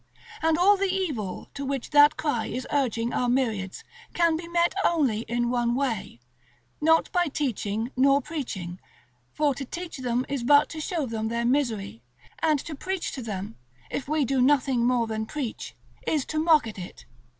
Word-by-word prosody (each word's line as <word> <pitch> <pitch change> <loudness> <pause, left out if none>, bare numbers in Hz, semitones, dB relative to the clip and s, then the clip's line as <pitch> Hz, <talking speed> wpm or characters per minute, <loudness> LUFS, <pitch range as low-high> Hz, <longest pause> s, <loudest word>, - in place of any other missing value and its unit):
And 320 0 +3
all 400 +4 +5
the 390 -1 +1
evil 285 - -3
to 280 - -5
which 275 -2 -3
that 295 +1 +6
cry 245 -8 -1
is 255 - -4
urging 240 -4 0
our 245 - +1
myriads 225 -7 -1 0.3
can 335 -2 +3
be 335 +1 -5
met 340 0 +2
only 275 -11 +2
in 240 0 0
one 240 -1 +1
way: 240 - -2 0.6
not 320 +1 +3
by 355 -1 +2
teaching 235 -5 -2
nor 275 +2 +5
preaching, 235 - -5 0.5
for 295 -2 +1
to 275 - -6
teach 340 +5 -6
them 250 0 0
is 275 -3 -2
but 285 +4 +5
to 315 - -6
show 320 -2 -2
them 220 -2 -3
their 235 +1 -1
misery, 235 - 0 0.4
and 310 -2 +3
to 325 - -7
preach 375 +5 -3
to 265 - -6
them, 210 -1 -5 0.3
if 270 - -3
we 305 -1 +1
do 265 +1 +1
nothing 255 -3 +3
more 245 -2 +2
than 220 -1 -3
preach, 275 -5 -5 0.3
is 300 -4 +1
to 310 - -2
mock 315 -3 +5
at 215 -3 -7
it. 180 - -9
265 Hz, 180 wpm, -26 LUFS, 230-310 Hz, 0.6 s, that